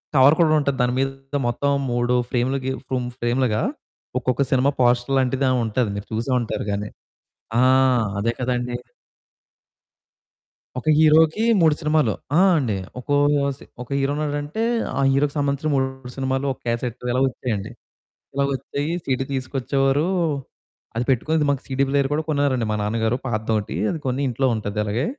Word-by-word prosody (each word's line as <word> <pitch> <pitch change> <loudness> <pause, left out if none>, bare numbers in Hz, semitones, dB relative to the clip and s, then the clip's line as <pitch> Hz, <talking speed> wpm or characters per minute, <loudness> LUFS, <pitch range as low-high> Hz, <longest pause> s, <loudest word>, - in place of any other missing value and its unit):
Cover 135 +3 +7
కూడా 165 -2 +4
ఉంటది. 140 -2 -1
దాని 125 0 +2
మీద 135 0 +2 0.4
మొత్తం 140 +4 0 0.2
3 120 0 +1 0.2
ఫ్రేములుగిఫ్ 130 +1 -1 0.4
ఫ్రేములుగా, 120 -2 +1 0.6
ఒక్కొక్క 125 +1 0
సినిమా 130 +1 +3
పోస్టర్ 120 +2 +2
లాంటిదని 130 0 +1
ఉంటాది. 110 +1 0
మీరు 100 0 -6
చూసే 115 +4 -2
ఉంటారు 115 -3 -3
గాని. 105 +1 -3 0.7
ఆ! - - +5 0.6
అదే 115 +3 +1
కదండీ. 125 -1 -1 2.0
ఒక 125 - -7
హీరోకి 160 +5 +5 0.2
3 160 -2 +5
సినిమాలు. 150 -7 +2 0.2
ఆ! - - +5 0.2
అండి, 120 -8 -1 0.2
ఒకో 145 +3 -1 0.4
స్ - - -22 0.2
ఒక 125 - -11
హీరో 135 +1 +1
ఉన్నాడంటే, 145 +6 -2 0.4
ఆ - - +1
హీరోకి 140 +1 +1
సంబంధించిన 140 +2 0
3 130 -1 -2
సినిమాలు 135 +1 -1
ఒక - - -13
క్యాసెట్టు 120 +1 -3
ఇలా 125 +1 +1
వచ్చాయండి. 120 -6 -3 0.6
ఇలా 140 +1 +1
వచ్చాయి 140 +3 -3
సీడీ 130 0 0
తీసుకొచ్చేవారు, 135 +2 0 0.9
అది 120 - 0
పెట్టుకొనేది 150 +5 +2
మాకు 140 -1 0
సీడీ 135 0 0
ప్లేయరు 140 -1 +1
కూడా 155 - 0
కొన్నారండి 140 -5 +1
మా - - 0
నాన్నగారు 110 +3 0
పాతదొకటి. 110 -4 -1
అది 165 - -4
కొని 130 +1 -1
ఇంట్లో 130 +2 0
ఉంటది 105 -1 -4
అలాగే. 110 +6 -1
130 Hz, 145 wpm, -22 LUFS, 120-140 Hz, 2.0 s, Cover